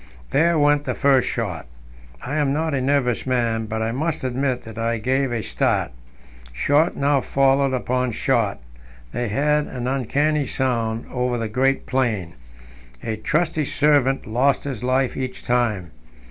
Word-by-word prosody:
There 165 +4 +3
went 145 0 +3
the - - -2
first 135 -2 +3
shot 95 - -3 0.6
I 135 - -4
am 145 -2 +1
not 155 +2 -1
a 135 - 0
nervous 130 -3 +1
man, 115 -3 0
but 110 0 -2
I 110 - -1
must 155 +5 -2
admit 130 0 -1
that 110 0 -9
I 115 0 0
gave 130 +3 0
a 115 -2 -2
start. - - 0 0.6
Shot 145 - +2
now 140 0 +2
followed 135 0 +2
upon 125 0 0
shot - - 0 0.5
they 120 - -2
had 150 +7 +1
an 125 -2 -5
uncanny 140 +3 0
sound 115 -3 -1
over 125 -1 -1
the 115 -1 -2
great 135 +5 +1
plain. 120 -10 -1 0.7
A 110 - -2
trusty 155 +7 0
servant 145 -2 +2
lost 130 +5 +1
his 135 -6 -5
life 130 +1 +1
each 130 -1 -5
time. 110 -8 0
130 Hz, 155 wpm, -22 LUFS, 115-140 Hz, 0.7 s, There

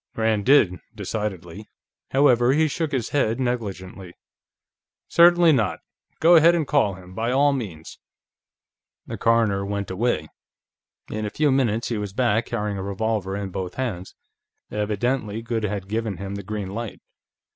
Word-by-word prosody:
Rand 110 -2 0
did, 110 -11 +5 0.2
decidedly. 100 -2 -5 0.4
However, 130 -2 +4
he 160 +2 +3
shook 155 +1 -2
his 130 -6 -2
head 125 -4 0
negligently. 100 -7 -4 0.9
"Certainly 175 -1 +6
not; 120 -7 +1 0.4
go 170 +2 +6
ahead 165 +1 +6
and 165 -3 0
call 135 -11 +2
him, 90 -1 -13
by 115 +5 -1
all 140 +2 +3
means." 95 - -6 1.1
The - - -7
coroner 115 -4 +2
went 100 0 -3
away. 95 -6 -1 0.8
In 110 0 -3
a 105 - -2
few 150 +5 +1
minutes 120 -4 +1
he 115 -3 -2
was 100 -2 -5
back, 120 -1 +1
carrying 105 -4 -3
a - - -4
revolver 100 0 -2
in 100 -2 -5
both 90 -1 -5
hands. 105 -9 -4 0.6
Evidently 105 +2 -2
Goode 115 -2 -2
had 100 -2 -4
given 110 -2 -2
him 100 0 -6
the 100 - -5
green 100 -1 -5
light. 115 +1 -6
110 Hz, 150 wpm, -23 LUFS, 100-125 Hz, 1.1 s, Certainly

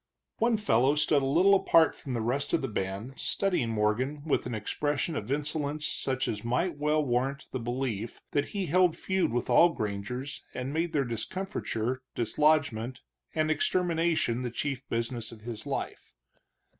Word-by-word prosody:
One 230 0 +3
fellow 135 - +3
stood 150 -1 +3
a - - 0
little 180 +8 +5
apart 165 -4 +5
from 130 -4 -5
the 115 - -1
rest 140 +5 -1
of - - +2
the - - 0
band, 100 +3 -3
studying 180 -12 0
Morgan 115 +7 0
with 150 - +1
an 120 - -3
expression 145 +8 -1
of 110 -2 -4
insolence 150 +1 -1
such 130 -1 -1
as 105 -1 -3
might 125 +10 0
well 150 0 +2
warrant 135 +3 -1
the 130 - -2
belief 120 -2 -3
that 145 0 +1
he 200 -2 -3
held 180 +1 +3
feud 190 -8 0
with 120 0 -1
all 175 - +6
grangers 125 +2 -4
and 130 +2 -3
made 165 +1 -1
their 140 -3 +2
discomfiture, 125 - -3
dislodgment, 130 -2 +1 0.3
and 155 0 +2
extermination 165 -6 +1
the 125 - -2
chief 130 +2 -4
business 115 0 -2
of 115 -2 -12
his 115 -1 -7
life. - - -4
135 Hz, 165 wpm, -29 LUFS, 120-155 Hz, 0.3 s, all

